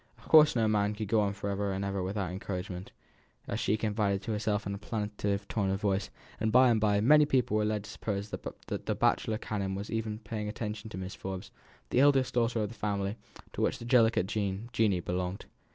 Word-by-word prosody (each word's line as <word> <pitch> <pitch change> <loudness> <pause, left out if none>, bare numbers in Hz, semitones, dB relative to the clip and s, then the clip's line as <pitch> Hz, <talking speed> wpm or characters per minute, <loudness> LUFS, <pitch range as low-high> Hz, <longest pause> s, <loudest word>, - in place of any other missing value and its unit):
"Of - - -18
course 155 -3 +7
no 115 -2 +3
man 105 -1 +1
could 105 -2 -4
go 110 0 +3
on 100 -1 0
for 100 0 -4
ever 100 0 -1
and 95 +1 -2
ever 100 -1 -2
without 95 -1 -2
encouragement," 90 -1 -5 0.6
as - - -2
she 105 - +1
confided 105 -2 0
to 115 - -3
herself 105 -1 -1
in 100 - -2
a 100 - -5
plaintive 105 -2 -2
tone 100 -3 0
of 95 0 0
voice; 100 -2 0 0.3
and 110 0 +1
by 125 +1 +6
and 110 -2 +2
by 105 -1 +3
many 150 +5 +6
people 125 -6 +2
were 105 0 +2
led 105 -1 -1
to - - -10
suppose 100 -1 -4
that - - -5 0.2
the - - -3
bachelor 110 - +1
canon 100 -3 -3
was 100 +2 -5 0.3
paying 105 -2 -4
attention 105 0 -5
to 100 - -7
Miss 95 +1 -5
Forbes, 95 -1 -6 0.4
the - - +3
eldest 135 -2 +4
daughter 115 -2 +1
of 105 - -2
the - - -9
family 100 -2 -2 0.4
to - - -4
which - - +1
the 120 - -9
delicate 115 -5 +4
Jeanie 105 0 0
belonged. 90 +2 -3
105 Hz, 215 wpm, -30 LUFS, 100-110 Hz, 0.6 s, course